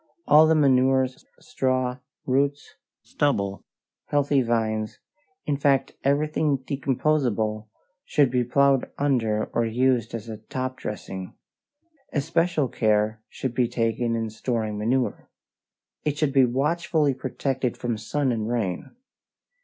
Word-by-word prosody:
All 155 +1 +7
the 160 - +4
manures, 130 -2 +2
straw, 130 - -1 0.3
roots, 140 +2 0 0.3
stubble, 100 -9 -1 0.4
healthy 145 -1 +2
vines 110 -2 -1 0.5
in 145 -2 0
fact 140 -1 +2
everything 150 +1 +1
decomposable 130 -5 -1 0.4
should 140 -4 +2
be 125 -1 +2
plowed 135 +2 +2
under 115 -7 +1
or 120 - +2
used 115 0 +1
as 115 0 -7
a 110 -1 -6
top 130 +4 -5
dressing. 95 -5 -6 0.8
Especial 165 0 +1
care 110 -1 +1
should 130 -3 -4
be 125 -1 +2
taken 115 0 0
in 115 -1 -2
storing 110 -1 -2
manure. 120 +5 -1 0.7
It 150 -1 -1
should 150 -3 0
be 135 -2 +6
watchfully 150 +3 +1
protected 130 -1 -2
from 120 -2 -2
sun 135 +4 -1
and 110 -2 -2
rain. 110 - -3
130 Hz, 120 wpm, -25 LUFS, 115-140 Hz, 0.8 s, All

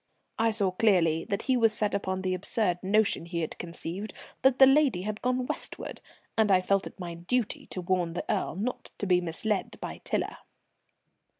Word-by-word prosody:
I 225 0 +4
saw 205 -4 +2
clearly 175 -5 +2
that 200 - -2
he 260 - +2
was 225 -3 +4
set 210 -1 +1
upon 190 -1 -2
the 185 -1 0
absurd 185 -1 0
notion 200 -3 +2
he 170 -1 -2
had 160 - -3
conceived 175 +4 -6 0.3
that 265 0 +4
the 265 - +9
lady 270 -9 +4
had 210 +1 -4
gone 250 0 0
westward, - - -4 0.3
and 220 -2 +3
I 185 - +6
felt 195 +1 +1
it - - -13
my 175 -2 -5
duty 210 +8 -2
to 185 - -5
warn 175 -2 0
the 175 - -4
Earl - - -1
not 220 +7 -4
to - - -3
be 180 -2 +3
misled 190 +5 -2
by - - -6
Tiler. - - -2
195 Hz, 190 wpm, -28 LUFS, 180-225 Hz, 0.3 s, the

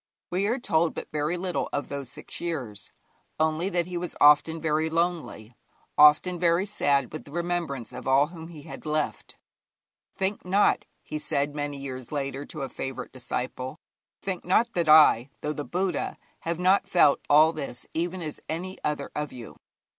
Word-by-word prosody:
We 190 +3 +1
are 235 +4 +1
told 170 -9 +1
but - - -7
very 150 +3 -1
little 180 0 -2
of 145 - -2
those 140 -3 -5
six 135 - -6
years, 125 -12 -4 0.5
only 160 +4 +1
that 175 -3 0
he 180 0 -5
was 175 0 -5
often 150 +2 +6
very 155 0 +1
lonely, 165 -9 -2 0.4
often 150 +4 +6
very 170 +2 +3
sad 140 - +1
with 155 - -6
the - - -13
remembrance 170 -7 -3
of 125 - -7
all 135 +2 +5
whom 165 0 -10
he 160 -4 -11
had - - -9
left. 155 0 -2 0.8
'Think 195 +2 -1
not,' 195 +3 +3 0.2
he 155 - -5
said 145 -1 -1
many 145 -1 -3
years 130 -3 -7
later 140 -1 -3
to 150 -4 -5
a - - -2
favourite 135 0 -6
disciple 130 +2 -4 0.5
'think 190 -2 -3
not 230 +6 +2
that 170 -3 0
I, 150 -5 +7
though 150 - -2
the 145 - -4
Buddha, 180 -2 -2 0.2
have 170 0 -3
not 190 +2 +3
felt 175 -6 +5
all 155 +2 +6
this 135 -6 -6
even 175 +2 -2
as 155 -2 -6
any 185 +4 -4
other 150 -2 -2
of 150 -1 -3
you. 120 -3 -10
155 Hz, 175 wpm, -27 LUFS, 140-175 Hz, 0.8 s, I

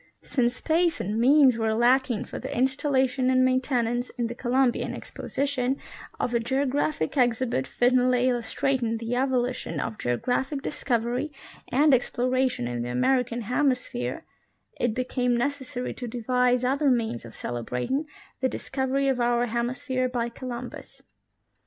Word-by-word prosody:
Since 245 -2 0
space 335 +4 +1
and 210 +4 -2
means 260 -1 +5
were 220 -1 +1
lacking 245 0 +2
for - - -7
the - - -5
installation 265 0 +1
and 255 0 +4
main 255 0 +3
tenance 245 -2 -1
in 240 - 0
the 230 - -3
Columbian 250 +1 +1
Exposition 270 -1 -2 0.4
of 245 - -1
a 235 - +3
geographic 270 - 0
exhibit 240 - +1
fittingly 250 - +3
illustrating 240 -1 0
the 230 +2 -3
evolution 250 - -1
of 115 -5 -4
geographic 260 - -1
discovery 245 +2 -1 0.4
and 290 +3 +5
exploration 255 - +1
in 120 -1 -3
the 120 - -3
American 240 - +1
hemisphere, 250 +1 -1 0.5
it 235 -3 0
became 250 -1 0
necessary 255 -1 -2
to 245 - -6
devise 250 +1 +1
other 275 +3 +2
means 230 - 0
of 115 -1 -11
celebrating 125 - -3 0.3
the 260 - +1
discovery 270 +1 -1
of 265 -2 +1
our 240 0 +2
hemis 240 +3 -2
phere 255 -2 0
by 240 -1 -1
Columbus. 245 0 -8
250 Hz, 140 wpm, -26 LUFS, 235-265 Hz, 0.5 s, means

